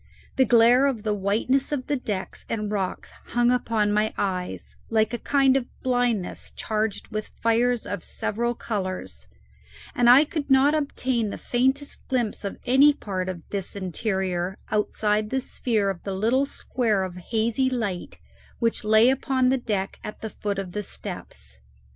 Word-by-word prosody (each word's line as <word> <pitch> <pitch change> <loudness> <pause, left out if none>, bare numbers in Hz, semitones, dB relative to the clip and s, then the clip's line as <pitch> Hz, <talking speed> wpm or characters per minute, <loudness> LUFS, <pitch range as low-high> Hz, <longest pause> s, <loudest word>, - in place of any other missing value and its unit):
The 260 - +4
glare 240 +3 +6
of 240 -6 -2
the 215 -1 0
whiteness 215 +8 +1
of 270 -3 -2
the 290 - 0
decks 210 -7 -4
and 215 -2 -2
rocks 195 -3 -3 0.2
hung 240 0 +4
upon 225 -4 +1
my 215 +1 +1
eyes 185 -2 -3
like 220 0 +2
a 240 - -2
kind 275 -2 +3
of 260 -3 0 0.2
blindness 245 -6 0
charged 215 -1 -2
with 215 -1 -4
fires 235 +1 +1
of 200 +2 -4
several 235 +3 -2
colours, 185 - -4 0.7
and 240 -1 +4
I 265 +5 +8
could 300 -2 -4
not 270 +2 +5
obtain 260 -6 0
the - - -5
faintest 265 +4 -1
glimpse 240 -6 -1
of 200 - -4
any 275 +4 +6
part 185 -6 -3
of 175 -3 -7
this 195 -1 -4
interior 190 -1 -2
outside 210 0 +1
the 265 - 0
sphere 220 -5 0
of 175 - -8
the 195 -1 -4
little 240 +8 +2
square 225 -8 0
of 180 -1 -5
hazy 230 +7 0
light 215 -8 -3 0.4
which 230 -1 0
lay 220 +3 +6
upon 260 -1 +1
the 265 0 +2
deck 200 -5 -2
at 210 - -7
the 220 - -5
foot 205 -1 -3
of 195 -2 -4
the 210 - -3
steps. 60 - -6
220 Hz, 165 wpm, -25 LUFS, 200-255 Hz, 0.7 s, I